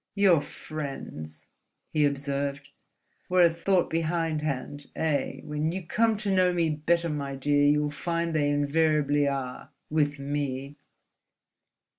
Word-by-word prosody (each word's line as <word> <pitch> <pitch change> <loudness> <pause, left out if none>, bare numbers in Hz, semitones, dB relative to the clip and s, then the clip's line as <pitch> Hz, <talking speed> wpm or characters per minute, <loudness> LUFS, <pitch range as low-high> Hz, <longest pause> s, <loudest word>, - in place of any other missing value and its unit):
"Your 190 -6 +5
friends," 135 - -7 0.5
he 150 -1 +4
observed, 140 0 -2 0.6
"were 180 0 +5
a 170 - +6
thought 180 +2 +2
behindhand, 155 -4 -1
eh? 140 -4 -1
When 150 +1 -1
you 185 +1 -4
come 225 +5 +2
to 205 -2 -1
know 185 -1 +4
me 170 -3 +1
better, 170 +3 +1
my 140 -3 -3
dear, 145 +1 +2
you'll 150 0 +2
find 170 +2 -2
they 145 -2 +2
invariably 145 0 +2
are—with 140 +2 -2
me." 140 -1 -3
150 Hz, 120 wpm, -27 LUFS, 140-165 Hz, 0.6 s, a